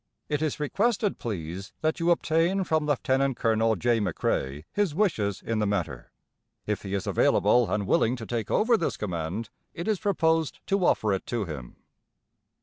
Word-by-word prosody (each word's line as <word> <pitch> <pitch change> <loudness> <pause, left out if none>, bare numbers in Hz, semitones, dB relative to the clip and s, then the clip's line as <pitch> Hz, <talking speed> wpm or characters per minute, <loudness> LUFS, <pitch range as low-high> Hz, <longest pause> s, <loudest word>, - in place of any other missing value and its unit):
It 150 -1 0
is 155 -2 -1
requested, 205 - 0
please, 95 -2 -5
that 155 +2 0
you 170 +1 +1
obtain 170 +3 +2
from 160 -3 0
Lieut. 145 -3 0
Col. 115 -4 +2
J. 120 +3 +1
McCrae 75 -7 -1
his 200 -7 0
wishes 110 - 0
in 115 -1 -1
the 105 - +1
matter. 80 -12 -3 0.5
If 105 -1 -2
he 100 0 -3
is 100 - -2
available, 120 -2 +3
and 105 -1 0
willing 115 +5 +2
to 115 -3 -7
take 115 -3 -3
over 230 +1 +3
this 170 - -2
command, 95 +3 -4 0.2
it 170 - -5
is 215 -4 +1
proposed 160 -6 +1
to 195 -1 +1
offer 105 -2 +2
it 95 - -3
to 115 -4 -1
him. 70 -8 -8
120 Hz, 170 wpm, -27 LUFS, 100-165 Hz, 0.5 s, available